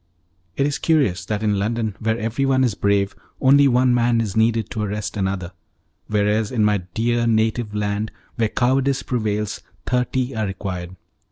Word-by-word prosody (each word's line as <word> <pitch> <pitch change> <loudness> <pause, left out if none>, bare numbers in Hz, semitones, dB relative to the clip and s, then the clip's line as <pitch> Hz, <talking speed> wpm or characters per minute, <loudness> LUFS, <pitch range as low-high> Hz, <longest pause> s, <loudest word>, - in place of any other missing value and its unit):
It 140 - +2
is 145 -1 -1
curious 130 - +1
that 105 +2 -2
in 105 -2 +1
London, 110 0 -1
where 110 0 0
everyone 130 +4 +1
is 120 -5 +2
brave, 100 0 +1 0.2
only 140 +1 +6
one 125 0 +3
man 120 -1 +2
is 105 -4 -2
needed 110 -1 +2
to 110 - -3
arrest 105 +1 -3
another, 95 -3 -2 0.6
whereas 105 +1 +1
in 110 -4 +2
my 105 -1 +2 0.2
dear 120 +1 +1
native 110 -1 +1
land, 105 +1 -1 0.2
where 115 -2 +1
cowardice 135 +3 +1
prevails, 105 -4 -2 0.2
thirty 125 +1 0
are 110 -2 -1
required. 95 -2 -5
110 Hz, 160 wpm, -21 LUFS, 105-125 Hz, 0.6 s, only